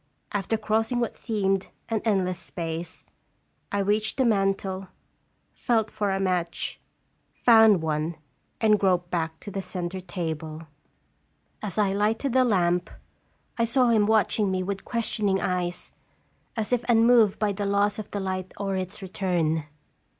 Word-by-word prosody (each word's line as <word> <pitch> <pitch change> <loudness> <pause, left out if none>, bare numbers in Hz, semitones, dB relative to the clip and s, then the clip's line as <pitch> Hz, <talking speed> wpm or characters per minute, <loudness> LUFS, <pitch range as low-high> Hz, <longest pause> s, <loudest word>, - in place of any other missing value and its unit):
After 205 +2 -1
crossing 220 +3 0
what 235 - -1
seemed 195 -4 -1 0.2
an 225 -2 -1
endless 185 -4 +1
space, 165 -2 -5 0.7
I 200 - 0
reached 210 +3 +1
the 260 - +3
mantel, 195 -3 0 0.7
felt 225 -3 0
for 205 -1 -1
a 195 0 0
match, 180 -3 -1 0.6
found 220 -7 +7
one, 155 +1 -1 0.4
and 215 -2 +4
groped 180 -2 +1
back 160 -2 -2
to 205 - -8
the 195 - -3
centre 180 0 -4
table. 160 -3 -5
3io - - -12 1.0
As 205 -2 -5
I 200 -2 +2
lighted 220 +6 0
the 260 0 +5
lamp, 180 -6 +2 0.7
I 230 - +4
saw 245 +1 +3
him 215 -3 +4
watching 215 -1 +2
me 185 -1 0
with 195 +1 -4
questioning 215 -4 0
eyes, 180 -1 -2 0.7
as 220 +2 -1
if 245 -1 +1
unmoved 230 -2 +5
by 210 -1 +1
the 200 0 -3
loss 205 +1 +1
of 215 - -6
the 205 - -3
light 185 -1 -4
or 195 -1 -2
its 185 +2 -4
return. 175 -5 0
195 Hz, 150 wpm, -26 LUFS, 180-220 Hz, 1.0 s, found